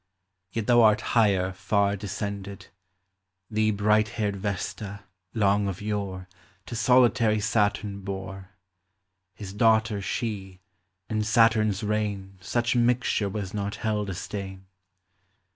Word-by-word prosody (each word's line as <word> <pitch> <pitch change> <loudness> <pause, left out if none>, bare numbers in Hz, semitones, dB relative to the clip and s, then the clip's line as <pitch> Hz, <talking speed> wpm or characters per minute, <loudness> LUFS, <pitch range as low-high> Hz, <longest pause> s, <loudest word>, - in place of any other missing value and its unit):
Yet 115 0 -3
thou 120 +1 +5
art 110 -1 +5
higher 95 -5 +3
far 100 +1 +1
descended; 100 0 -6 0.8
Thee 110 0 +2
bright 105 +1 +2
haired 105 -3 -3
Yesta, 100 0 -4 0.3
long 100 -1 +2
of 95 -2 -4
yore, 100 -3 -4 0.4
To 120 - -6
solitary 115 -2 +4
Saturn 105 -1 0
bore, 95 0 -6 0.4
— 100 +1 -52 0.3
His 100 -2 -8
daughter 110 -1 +3
she 95 -3 -4 0.5
(in 110 -1 -1
Saturn's 110 -2 +3
reign 100 -3 -2
Such 120 +5 0
mixture 120 -3 +2
was 100 -2 -5
not 100 -1 -3
held 105 -2 -2
a 95 - -4
stain). 95 0 -6
105 Hz, 120 wpm, -26 LUFS, 100-110 Hz, 0.8 s, thou